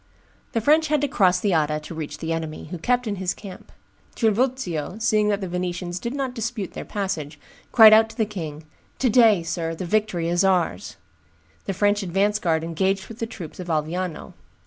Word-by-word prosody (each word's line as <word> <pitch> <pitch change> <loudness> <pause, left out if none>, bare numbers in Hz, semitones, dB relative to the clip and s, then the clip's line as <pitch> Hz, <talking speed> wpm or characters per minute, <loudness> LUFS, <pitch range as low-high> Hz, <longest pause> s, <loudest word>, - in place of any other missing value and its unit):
The 230 - +1
French 310 +6 +4
had 300 0 +2
to 290 - +1
cross 185 -8 +3
the 200 0 +1
Adda 150 -1 +1
to 150 - -9
reach 155 -2 -6
the 165 0 -3
enemy, 160 -2 -5
who 180 - -5
kept 245 +6 +1
in 205 -2 -3
his 180 -1 -2
camp. 195 -3 -11 0.4
Trivulzio, 220 - 0
seeing 215 -2 +2
that 205 -1 0
the 190 - -3
Venetians 180 0 -3
did 235 +7 -4
not 270 -3 -2
dispute 225 -4 -4
their - - -6
passage, 160 -8 -4 0.3
cried 220 -2 +9
out 220 +1 +6
to 225 - -14
the 220 - +2
king, 160 -7 -6 0.3
"To 255 -3 +1
day, 220 -7 +5
sir, 165 0 -3
the 180 - -5
victory 180 -3 0
is 175 +2 +2
ours!" 105 - 0 0.7
The 195 - -2
French 205 +2 +2
advance 200 +3 +1
guard 160 -4 0
engaged 190 +4 -1
with 225 +1 -10
the 230 - -2
troops 180 -8 -9
of 180 - -6
Alviano. 165 +2 -3
190 Hz, 195 wpm, -23 LUFS, 165-220 Hz, 0.7 s, cried